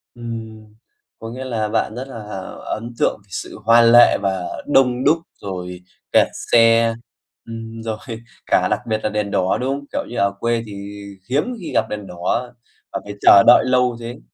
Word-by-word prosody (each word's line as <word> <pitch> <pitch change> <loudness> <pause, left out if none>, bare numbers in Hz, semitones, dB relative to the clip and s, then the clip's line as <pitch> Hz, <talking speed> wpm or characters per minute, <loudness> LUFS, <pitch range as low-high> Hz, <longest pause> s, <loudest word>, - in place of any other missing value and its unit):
Ừm. 115 -2 -7 0.5
Có 115 - -7
nghĩa 130 +2 -6
là 110 -4 -2
bạn 110 - -1
rất 130 +2 -6
là 115 -5 -8 0.4
ấn 115 +2 -5
tượng - - +1
sự 90 - -7
hoa 115 +1 +6
lệ 120 +1 +7
và 95 -2 -1 0.2
đông 130 -3 +3
đúc 155 +4 +4 0.2
rồi 90 -2 -6 0.3
kẹt - - +5 0.2
xe, 115 0 +5 0.5
ừm, 115 0 -8
rồi 110 -1 -3 0.5
cả - - +2
đặc - - +1
biệt 110 0 0
là - - 0
đèn 105 -1 -2
đỏ, 95 0 +1
đúng 130 - -1
không? 140 0 -6
Kiểu - - -3
như, 120 - -6
ở 100 0 +2
quê 115 -1 0
thì 100 0 -9 0.3
hiếm 140 +4 +2 0.2
khi 175 - -7
gặp 110 - +2
đèn 105 -2 -5
đỏ 115 +8 -2 0.4
và - - -2
phải 100 - -7
chờ 100 - +8
đợi - - +7
lâu 125 -1 +2
thế. 120 +1 -7
115 Hz, 185 wpm, -20 LUFS, 105-120 Hz, 0.5 s, chờ